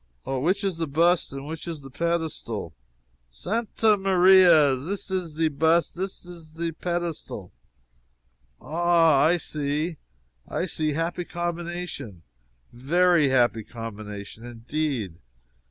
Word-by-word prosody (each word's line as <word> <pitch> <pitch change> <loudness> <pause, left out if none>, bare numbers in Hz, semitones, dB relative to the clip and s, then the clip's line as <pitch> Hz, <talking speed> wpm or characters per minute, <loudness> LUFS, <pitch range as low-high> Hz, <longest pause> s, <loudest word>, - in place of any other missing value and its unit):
"Ah 135 -1 -2
which 185 +9 +1
is 190 -4 -1
the 165 -1 -2
bust 170 +5 +2
and 135 0 -7
which 160 +2 -7
is 165 -3 -5
the 135 -1 -12
pedestal?" 155 - -3 0.6
"Santa 215 - +1
Maria! 185 -6 +6
zis 185 +11 -4
ze 165 -4 -1
bust! 160 +3 +2
zis 190 +2 -4
ze 165 -1 -6
pedestal!" 165 - -4 1.1
"Ah, 165 -2 +3
I 170 +3 +4
see, 155 +1 -2 0.5
I - - -2
see 155 -4 -1
happy 165 +3 -2
combination 175 - -5 0.5
very 165 +4 +3
happy 120 -4 +2
combination, 110 -1 -8
indeed. 120 - -3
160 Hz, 110 wpm, -25 LUFS, 135-175 Hz, 1.1 s, Maria